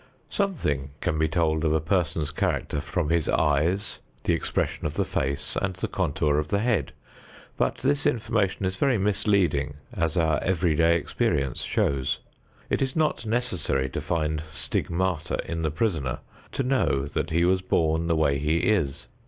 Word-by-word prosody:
Something 75 - -1
can 75 - -1
be 80 - +3
told 80 -1 +1
of 80 -1 +2
a 80 - +3
person's 80 -2 0
character 75 - -1
from 75 - -2
his 85 -3 +2
eyes, 85 +8 +1 0.2
the - - +2
expression - - -1
of 75 - -6
the - - +1
face 70 +1 -1
and 95 -1 -1
the 95 - -3
contour 75 -4 +1
of 75 - -2
the 100 - +1
head, 105 - 0 0.6
but - - 0
this 145 +2 +1
information 110 -7 0
is 95 0 -1
very 130 +2 +3
misleading 95 -8 +1 0.2
as 80 +1 -1
our 80 -2 +2
everyday 85 -2 +3
experience 70 -5 0
shows. 70 -2 0 0.5
It - - 0
is 135 0 0
not 155 -7 0
necessary 90 - 0
to - - -3
find 75 -2 -1
stigmata 85 +1 -1
in 80 0 -3
the 80 - +1
prisoner 80 - -1 0.3
to 135 - 0
know 125 - +1
that 70 - -2
he 85 +2 +2
was 95 +1 +3
born 80 -2 +1
the 85 - +2
way 70 -3 +2
he 75 +3 +1
is. 80 -8 +1
80 Hz, 165 wpm, -26 LUFS, 75-95 Hz, 0.6 s, be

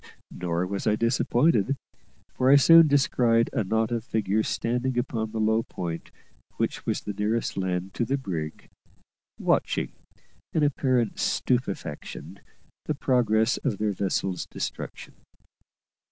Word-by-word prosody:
Nor 90 0 -2
was 100 +3 -3
I 105 - +4
disappointed, 120 +2 +2 0.6
for 130 - +2
I 140 - +8
soon 165 +3 +8
descried 125 -5 +3
a - - +1
knot 110 +3 0
of 115 -2 -1
figures 110 -2 0
standing 125 +2 -1
upon 115 -3 -1
the 110 0 -4
low 110 +1 +2
point, 85 -6 -6 0.5
which - - -2
was - - 0
the 105 - -5
nearest 105 +3 -1
land 95 0 -2
to 120 - -1
the 135 +3 0
brig, 80 - -5 0.7
watching, - - 0 0.6
in 155 - +2
apparent 130 -5 +1
stupefaction, 100 - -2 0.5
the 155 - -1
progress 120 -4 +2
of 120 -8 -2
their 105 +1 0
vessel's 95 -2 -2
destruction. - - -6
110 Hz, 130 wpm, -26 LUFS, 100-125 Hz, 0.7 s, I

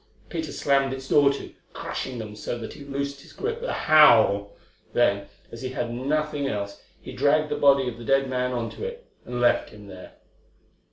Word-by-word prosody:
Peter 160 -3 -4
slammed 135 -1 +1
its 135 0 -7
door 145 -1 +5
to, 140 - -7 0.2
crushing 130 -2 -5
them 105 -2 -7
so 105 +3 -4
that 115 - -7
he 145 - -11
loosed 140 0 -4
his - - -16
grip, 455 +2 -3
with - - -3
a - - -3
howl. 100 -10 +6 0.4
Then, 100 -4 +2 0.2
as 115 - -9
he 130 - -3
had 120 -2 -3
nothing 145 +3 -1
else, 100 -4 -4 0.2
he - - -10
dragged 150 +1 +2
the - - -1
body 140 -2 +4
of 120 -1 -5
the - - -8
dead 135 +2 +2
man 125 -1 -1
on 120 -2 -3
to - - -9
it 475 0 -6 0.2
and 125 0 -4
left 120 0 +3
him 105 -1 -13
there. 90 -1 -11
135 Hz, 205 wpm, -25 LUFS, 120-145 Hz, 0.4 s, howl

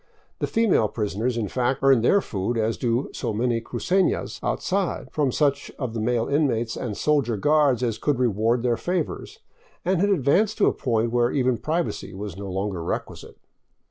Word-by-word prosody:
The - - -1
female 220 - +2
prisoners, 110 +3 -2
in 110 -3 -1
fact, 125 +4 -1
earned 135 -4 +5
their 200 +11 +4
food 105 - -3
as 110 0 0
do 120 +1 -1
so 115 -4 -3
many 115 +1 0
crucefias 180 +12 0
outside, 195 -1 -1
from 145 -4 +1
such 140 +1 0
of 130 -5 -4
the 115 - -3
male 115 +1 0
inmates 125 -6 0
and 110 -5 -4
soldier 140 -7 +1
guards 145 0 +3
as 115 -3 -1
could 145 -3 0
reward 115 0 +1
their 120 -2 +1
favors, 175 -3 -3 0.4
and 180 -1 +2
had 200 - +3
advanced 195 - +2
to 210 - +4
a - - +3
point 115 -2 0
where 120 0 +2
even 130 -4 +1
privacy 160 - -2
was 100 -2 -6
no 100 0 -6
longer 95 -2 -3
requisite. - - -5
125 Hz, 175 wpm, -24 LUFS, 115-150 Hz, 0.4 s, earned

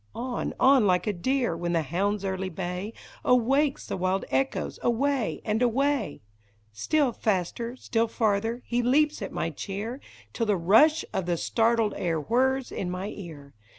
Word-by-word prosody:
On, 245 0 -3
on 265 -5 +5
like 180 -1 +2
a 210 - 0
deer, 245 +1 0
when 175 +1 -2
the 165 -2 +1
hound's 195 +6 -1
early 190 0 -2
bay 180 +3 -4 0.3
Awakes 270 +4 +2
the - - -4
wild 185 +1 0
echoes, 270 0 -1
away, 260 +1 0
and 220 +1 0
away! 250 - +1 0.5
Still 285 - +1
faster, 220 +5 -2
still 230 -2 0
farther, 225 +2 0
he 240 0 0
leaps 295 +3 +2
at 195 - -4
my 165 - -2
cheer. 210 - -5 0.3
Till 230 - -1
the 205 -2 +2
rush 255 - +4
of 185 - -2
the 175 -1 +1
startled 225 +2 +1
air 165 -3 -1
whirs 260 - +1
in 180 - -3
my 185 +3 -4
ear 155 -9 -10
220 Hz, 160 wpm, -27 LUFS, 185-255 Hz, 0.5 s, on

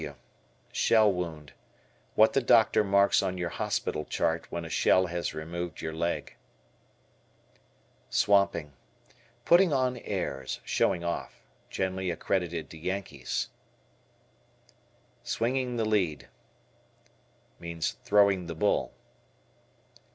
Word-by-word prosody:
S.W. - - -7 0.5
Shell 110 -3 +4
wound. 80 -5 -5 0.6
What 110 +1 +5
the 135 - +3
doctor 115 -3 +4
marks 100 0 +4
on 95 -1 -2
your 90 -1 -2
hospital 75 - -2
chart 80 +2 -1
when 85 -1 -4
a - - -7
shell 95 +3 +3
has 85 -1 -3
removed 85 +2 -5
your 80 -1 -4
leg. 85 +2 -3 1.7
Swamping. 100 -7 +2 0.7
Putting 175 0 +5
on 130 -2 +1
airs; 70 - -4
showing 85 - +1
off. 85 0 -4 0.3
Generally 95 0 -2
accredited 85 -1 -2
to 80 - -10
Yankees. 85 -7 -3 1.7
"Swinging 125 +1 -1
the 115 - 0
lead." 85 - 0 1.7
Throwing 100 -3 +3
the 85 - -5
bull. 100 +6 0
90 Hz, 100 wpm, -28 LUFS, 85-105 Hz, 1.7 s, What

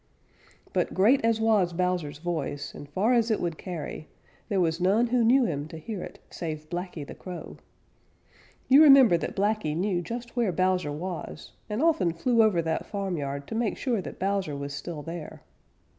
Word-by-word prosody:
But - - 0
great 230 +8 +4
as 225 -1 +2
was 210 -6 +2
Bowser's 175 -4 -1
voice, 160 -3 -4
and 145 - -10
far 200 +11 +1
as 235 -1 +3
it 220 - +1
would 170 -3 -3
carry, 165 -3 -6 0.4
there 200 - +1
was 165 -1 +1
none 200 +6 +3
who 245 0 +2
knew 250 +3 +5
him 145 -6 -3
to 160 - -9
hear 190 +4 -6
it, - - -8
save 155 -2 -5
Blacky 175 -4 -4
the - - -9
Crow. 180 -2 -8 1.1
You 275 +3 +7
remember 275 - +8
that - - -4
Blacky 200 -6 0
knew 185 -1 0
just 235 +6 -7
where 235 -6 +1
Bowser 185 -3 +1
was 150 - -6 0.2
and 215 +7 -1
often 315 - +2
flew 230 +8 +2
over 200 -7 +3
that 160 0 -2
farmyard 155 -9 -3
to - - -5
make 225 -1 -1
sure 240 -7 -1
that - - -8
Bowser 195 -5 -1
was 140 0 -5
still 150 +1 -6
there. 165 -1 -8
185 Hz, 180 wpm, -27 LUFS, 160-225 Hz, 1.1 s, remember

